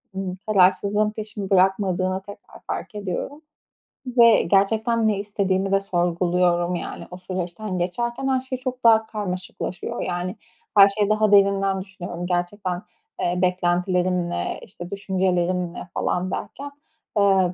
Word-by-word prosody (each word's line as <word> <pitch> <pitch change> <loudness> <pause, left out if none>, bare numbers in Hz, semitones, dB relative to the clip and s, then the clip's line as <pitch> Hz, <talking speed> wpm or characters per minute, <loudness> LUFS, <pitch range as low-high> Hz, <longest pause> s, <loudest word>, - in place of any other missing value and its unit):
ımm, 190 -1 -4
kararsızlığın 205 +1 +3
peşimi 210 -2 -6
bırakmadığını 190 -1 +2
tekrar 205 +1 -13
fark 220 - -5
ediyorum 205 - -4 0.7
ve 235 -3 +6
gerçekten 220 +5 +2
ne 210 -2 +1
istediğimi 195 -1 -1
de 195 - +3
sorguluyorum. 175 -1 +1
Yani - - -6
o 180 - -7
süreçten 185 +2 -4
geçerken 235 +9 -2
her 260 -1 +2
şey 260 0 -5
çok 255 -1 -5
daha 225 -1 +6
karmaşıklaşıyor. 195 +1 -5
Yani 180 +2 -3 0.4
her 200 0 +9
şeyi 205 0 0
daha 215 0 +3
derinden 195 -1 +4
düşünüyorum. 175 -2 -7
Gerçekten, 180 +1 -2 0.4
eee, 175 +1 0
"Beklentilerim 180 0 +1
ne?", - - -3
işte, 175 -2 -10
"Düşüncelerim 185 -3 0
ne?" - - -8
falan 180 +1 -1
derken, 275 +10 -5 0.5
ııı 190 -3 +3
190 Hz, 130 wpm, -23 LUFS, 180-210 Hz, 0.7 s, her